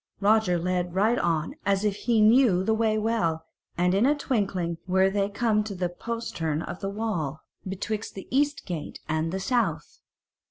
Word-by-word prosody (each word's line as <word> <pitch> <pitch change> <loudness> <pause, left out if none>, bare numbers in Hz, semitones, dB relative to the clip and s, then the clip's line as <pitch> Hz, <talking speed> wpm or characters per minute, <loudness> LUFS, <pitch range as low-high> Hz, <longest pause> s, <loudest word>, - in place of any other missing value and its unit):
Roger 205 -3 +3
led 180 0 -1
right 220 +5 +3
on 165 -2 0
as 200 +1 +1
if 205 -2 +1
he 225 0 +1
knew 215 -4 +5
the 220 - +2
way 220 -1 +1
well, 190 -8 0 0.3
and 180 +1 +2
in 200 +3 +3
a 295 - +3
twinkling 195 - -1
were 190 +1 +3
they 200 0 0
come 215 0 +1
to 210 -2 -6
a - - -1
postern 175 -6 -3
in - - -4
the 195 - -2
wall 175 -9 -3 0.3
betwixt 210 +3 -4
the 195 - -8
East 290 +1 +1
Gate 170 -5 -5
and 160 +1 -1
the 190 - -2
South. 240 +4 -1
195 Hz, 175 wpm, -26 LUFS, 175-220 Hz, 0.3 s, knew